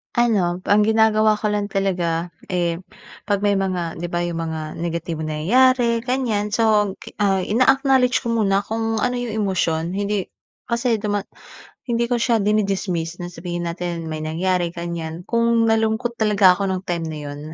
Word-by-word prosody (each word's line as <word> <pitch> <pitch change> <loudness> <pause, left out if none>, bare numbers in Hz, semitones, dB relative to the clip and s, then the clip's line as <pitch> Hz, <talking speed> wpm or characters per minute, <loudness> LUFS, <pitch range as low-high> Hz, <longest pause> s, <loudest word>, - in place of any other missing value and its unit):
Ano, 195 -7 +2
ang 210 +1 +5
ginagawa 220 -1 +4
ko 210 0 -1
lang 205 0 0
talaga, 180 -4 -1 0.2
eh, 175 -2 -1 0.5
'pag 200 -1 0
may 205 -1 +2
mga 180 -4 -2
'di 170 - -4
ba, 175 - +1
yung 175 -1 -2
mga 155 -1 -5
negatibong 165 -1 -3
nangyayari, 235 +9 +2
ganyan. 230 -5 -1
So, 210 -3 +3
gi - - -12
ah, 195 -2 +2
ina-acknowledge 255 +4 +3
ko 235 - -4
muna 200 -4 +2
kung 225 +1 -2
ano 250 +1 0
yung 245 -3 -3
emosyon, 170 -4 0
hindi 200 +1 -2 0.4
kasi 235 -2 0
duma 205 -2 -1 0.6
hindi 235 0 +1
ko 240 0 -1
siya 235 -1 +3
dini-dismiss 195 -5 0
na 175 - -6
sabihin 175 0 -4
natin 170 -1 -4
may 155 -1 -4
nangyari, 175 +3 0
ganyan. 170 0 -6
Kung 230 -1 +2
nalungkot 225 +1 +1
talaga 210 -5 +4
ako 195 +1 -2
nung 185 0 -3
time 170 -2 -2
na 155 - -5
'yon, 145 0 -7
200 Hz, 165 wpm, -21 LUFS, 175-225 Hz, 0.6 s, ang